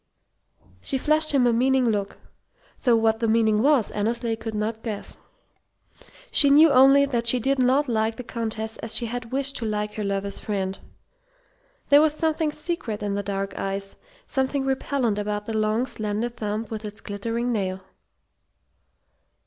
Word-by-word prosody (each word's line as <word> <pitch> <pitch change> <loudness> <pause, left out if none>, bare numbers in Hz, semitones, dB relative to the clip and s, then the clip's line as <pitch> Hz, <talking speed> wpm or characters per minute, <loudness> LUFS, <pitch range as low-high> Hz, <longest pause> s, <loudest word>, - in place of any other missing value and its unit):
She 270 - -1
flashed 310 +3 +2
him 270 -3 +3
a 240 - +3
meaning 260 +1 +2
look, 205 -3 -2 0.7
though 240 -2 +5
what 225 0 +2
the 230 - 0
meaning 220 -1 +2
was 275 -5 +3
Annesley 230 +2 -1
could 225 -1 -6
not 220 +1 -3
guess. 215 -3 -6 1.2
She 285 - +6
knew 300 +2 +7
only 275 +1 +6
that 240 -4 -2
she 250 +1 +5
did 270 +3 0
not 260 +3 +3
like 220 -1 0
the 250 - -7
Countess 220 -2 -4
as 225 - -1
she 240 - +2
had 230 0 -5
wished 275 +1 0
to 230 - -4
like 210 -1 -2
her 210 - -4
lover's 200 0 -2
friend. 195 -2 -3 1.1
There 285 +1 +7
was 305 -1 +2
something 315 -1 0
secret 300 -10 -4
in 205 -1 -2
the 200 - -1
dark 195 0 -4
eyes, 195 0 -4 0.3
something 270 0 -1
repellent 265 -5 -1
about 210 0 -3
the 225 - -4
long, 215 +3 +1
slender 215 -1 -2
thumb 220 -2 -4
with 220 -1 -5
its 210 0 -7
glittering 230 +4 -3
nail. 190 -4 -2
230 Hz, 165 wpm, -24 LUFS, 210-265 Hz, 1.2 s, knew